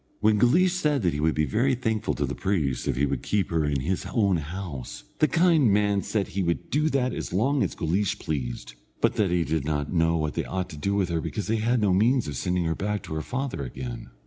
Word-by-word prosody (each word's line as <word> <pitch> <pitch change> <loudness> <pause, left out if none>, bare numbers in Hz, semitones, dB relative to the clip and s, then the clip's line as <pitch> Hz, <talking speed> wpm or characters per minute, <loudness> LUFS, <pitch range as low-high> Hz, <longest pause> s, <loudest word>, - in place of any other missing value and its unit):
When 105 -1 +3
Guleesh 175 - +4
said 150 - +1
that 85 - +2
he 75 - -3
would 80 +1 +1
be 75 - +2
very 125 - +1
thankful 110 -3 -1
to - - 0
the - - -4
priest 75 -10 -1
if - - +1
he 70 +3 +2
would 70 - -2
keep 100 -4 -1
her 80 -2 +1
in 70 -3 0
his 90 +7 -2
own 100 -5 +2
house, 80 -4 -6 0.2
the 155 - +5
kind 165 - +4
man 100 -1 +2
said 100 -2 -2
he 100 - -2
would 85 -2 -2
do 150 +2 +2
that 130 -3 0
as - - -5
long 130 +10 +1
as - - -1
Guleesh 100 +5 0
pleased, 60 -8 -4 0.3
but - - +2
that 105 -4 +2
he 85 -1 +2
did 80 -2 -1
not 75 +1 -2
know 80 -1 +2
what 75 -2 -1
they - - -1
ought 95 -1 -3
to - - -8
do 100 +7 -1
with 95 -3 +1
her, 85 -1 -1
because 105 +6 -4
they 110 +1 0
had 120 +3 +1
no 100 -3 +3
means 115 - +3
of 75 - -4
sending 90 +4 0
her 80 - +1
back 105 +4 -2
to - - -7
her 80 - -2
father 130 - -3
again. 65 -1 -6
95 Hz, 250 wpm, -26 LUFS, 80-110 Hz, 0.3 s, the